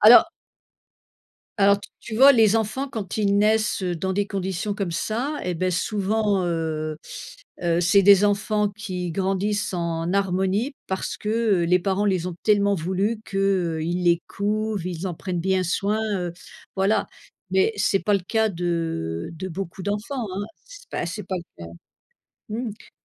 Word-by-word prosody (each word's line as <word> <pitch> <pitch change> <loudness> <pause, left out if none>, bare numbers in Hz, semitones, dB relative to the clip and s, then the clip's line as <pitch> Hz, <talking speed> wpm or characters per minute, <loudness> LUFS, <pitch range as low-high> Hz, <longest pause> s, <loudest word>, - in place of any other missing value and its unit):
Alors 240 +10 +8 1.3
alors 200 0 +5
t - - -11
tu 225 - -7
vois 275 +4 +9
les 220 -4 +5
enfants 225 +5 0
quand 215 -7 -5
ils 200 -2 +2
naissent, 215 0 +2
heu, 180 -2 -1
dans 190 +3 -2
des 200 +1 0
conditions 195 0 -2
comme 200 -4 -2
ça, 250 - -2
eh 180 - -2
beh, 185 +2 0
souvent, 205 +1 0
heu 155 -2 -2 0.7
heu, 170 -1 +2
c'est 180 +3 +5
des 200 +1 +7
enfants 210 +1 +1
qui 185 -4 -5
grandissent 195 +3 -1
en 170 0 -2
harmonie 195 +6 0
parce 190 0 -3
que 215 -4 +1
les 180 +1 +5
parents 195 +2 0
les 185 -3 +1
ont 180 -2 -5
tellement 200 -1 +4
voulu 190 +6 -1
qu'ils 180 -4 0
les 170 0 +3
couvent, 215 +1 -1
ils 180 0 -4
en 175 - -4
prennent 180 +1 -3
bien 190 +1 +1
soin, 200 +5 0 0.2
heu, 175 -1 -3 0.4
voilà. 195 +3 +2 0.4
Mais 190 +4 +3
c'est 200 -1 +2
pas 210 - +2
le 200 - +2
cas 220 +5 +1
de 165 - -2
de 185 +4 -5
beaucoup 185 +1 -6
d'enfants, 215 +5 -3
hein, 200 +2 -2 0.2
c'est - - -14
pas - - -2
c'est 185 +5 -5
pas 185 - -3
le 170 - -10
cas. 85 - -9 0.8
Mmh 235 +3 -2
mh. 210 - -14
195 Hz, 165 wpm, -24 LUFS, 180-210 Hz, 1.3 s, vois